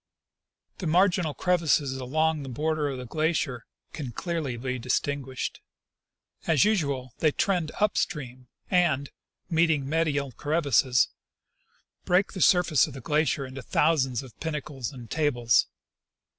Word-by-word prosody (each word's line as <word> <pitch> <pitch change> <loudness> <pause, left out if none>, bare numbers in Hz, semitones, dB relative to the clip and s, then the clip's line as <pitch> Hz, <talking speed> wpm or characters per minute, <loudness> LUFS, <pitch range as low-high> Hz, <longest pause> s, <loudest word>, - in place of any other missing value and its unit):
The 180 - -3
marginal 175 -2 +2
crevasses 160 -6 +1
along 155 +4 0
the 135 - -7
border 150 +3 -1
of 135 - -4
the 125 - -6
glacier 155 -3 -1 0.3
can 140 -6 -5
clearly 155 -2 -3
be 130 +1 -3
distinguished. 130 +2 -2 0.9
As 160 +3 +4
usual, 140 - 0
they 155 - +3
trend 175 -1 0
up 210 0 +2
stream 130 -6 -3 0.2
and, 165 -7 +2 0.4
meeting 160 -5 +2
medial 145 -3 0
crevasses, 140 -3 +2 0.9
break 180 +3 +2
the 185 - -5
surface 175 -6 +4
of 145 - -10
the - - -7
glacier 150 +1 +1
into 130 +1 -8
thousands 135 -2 +1
of 130 -4 -13
pinnacles 145 -6 -4
and 125 -4 -10
tables. 125 -7 +2
150 Hz, 130 wpm, -27 LUFS, 130-165 Hz, 0.9 s, As